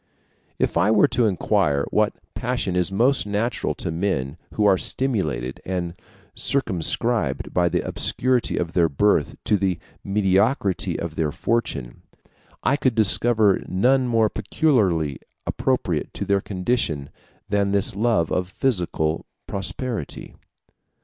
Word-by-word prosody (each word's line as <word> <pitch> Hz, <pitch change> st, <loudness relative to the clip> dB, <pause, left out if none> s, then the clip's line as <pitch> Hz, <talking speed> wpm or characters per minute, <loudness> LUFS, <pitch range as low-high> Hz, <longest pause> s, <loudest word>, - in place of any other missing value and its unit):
If -, -, 0 dB
I 90 Hz, +5 st, +3 dB
were 110 Hz, -1 st, +5 dB
to 120 Hz, -2 st, +2 dB
inquire 75 Hz, -7 st, +1 dB
what -, -, +2 dB, 0.2 s
passion 120 Hz, -6 st, -2 dB
is 90 Hz, +1 st, +1 dB
most 120 Hz, +4 st, +2 dB
natural 105 Hz, +4 st, -1 dB
to -, -, -3 dB
men 80 Hz, -6 st, -1 dB, 0.2 s
who 105 Hz, -, +2 dB
are 100 Hz, -2 st, +6 dB
stimulated 80 Hz, -, -2 dB
and 90 Hz, -2 st, -3 dB, 0.4 s
circumscribed 115 Hz, -, 0 dB
by 90 Hz, -1 st, +3 dB
the 90 Hz, 0 st, 0 dB
obscurity 130 Hz, -1 st, 0 dB
of 85 Hz, -1 st, -2 dB
their 85 Hz, -3 st, +3 dB
birth 80 Hz, 0 st, +2 dB, 0.2 s
or -, -, +6 dB
the 95 Hz, -2 st, 0 dB, 0.3 s
mediocrity 100 Hz, -, +1 dB
of 85 Hz, -2 st, -4 dB
their 80 Hz, -2 st, -1 dB
fortune, 70 Hz, -, -2 dB, 0.6 s
I 140 Hz, -, +2 dB
could 130 Hz, -5 st, +1 dB
discover 110 Hz, -1 st, +4 dB
none 125 Hz, +7 st, +2 dB
more 115 Hz, -2 st, +3 dB
peculiarly 90 Hz, -, +1 dB, 0.3 s
appropriate -, -, -1 dB
to -, -, -3 dB
their 100 Hz, 0 st, +2 dB
condition 90 Hz, -, -1 dB, 0.4 s
than 100 Hz, -1 st, +1 dB
this 100 Hz, -1 st, +1 dB
love 105 Hz, -6 st, +1 dB
of 90 Hz, 0 st, -1 dB
physical 90 Hz, -9 st, -1 dB, 0.2 s
prosperity. 100 Hz, -, -4 dB
100 Hz, 130 wpm, -23 LUFS, 85-115 Hz, 0.6 s, are